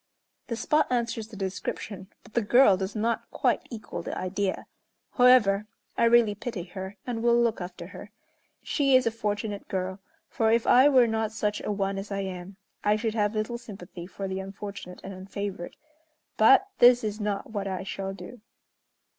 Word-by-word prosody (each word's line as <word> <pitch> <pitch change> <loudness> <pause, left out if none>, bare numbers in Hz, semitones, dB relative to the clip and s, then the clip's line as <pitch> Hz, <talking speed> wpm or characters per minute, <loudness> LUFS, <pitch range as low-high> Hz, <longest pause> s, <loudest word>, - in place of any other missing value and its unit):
The 235 - -2
spot 300 +7 +2
answers 230 -3 -1
the 220 - -12
description, 190 0 -5 0.2
but 220 - -18
the 235 - +2
girl 230 -1 +6
does 190 +2 -4
not 225 +2 -1
quite - - 0
equal 225 -3 -6
the - - -5
idea; 190 +1 -2 0.5
however, 220 -5 +5 0.3
I - - +3
really 230 -2 +5
pity 205 -2 -5
her, 190 +2 -8
and 235 -2 -3
will 235 0 +4
look 230 -4 +1
after 180 -1 -7
her. 195 +3 -10 0.5
She 275 -3 +2
is 255 -1 +5
a 230 - +2
fortunate 210 -2 -3
girl, 185 0 -3 0.3
for 225 -3 +1
if 230 0 +2
I 260 +4 +6
were 255 -4 +6
not 220 -1 -1
such 210 -1 -1
a - - -3
one 195 -1 -1
as 205 +1 -8
I 200 0 -1
am, 190 0 -7 0.3
I 210 0 +3
should 220 0 -2
have 210 -1 0
little 215 +3 -2
sympathy 180 -5 -10
for 195 +1 -6
the 190 0 -3
unfortunate 195 -1 -8
and 195 - -7
unfavored. 190 -1 -6 0.6
But 270 - +6
this 245 0 +7
is 210 0 -3
not 205 0 -3
what 200 -2 -3
I 190 -1 -3
shall 195 0 -4
do." 195 +5 -10
210 Hz, 180 wpm, -27 LUFS, 195-230 Hz, 0.6 s, this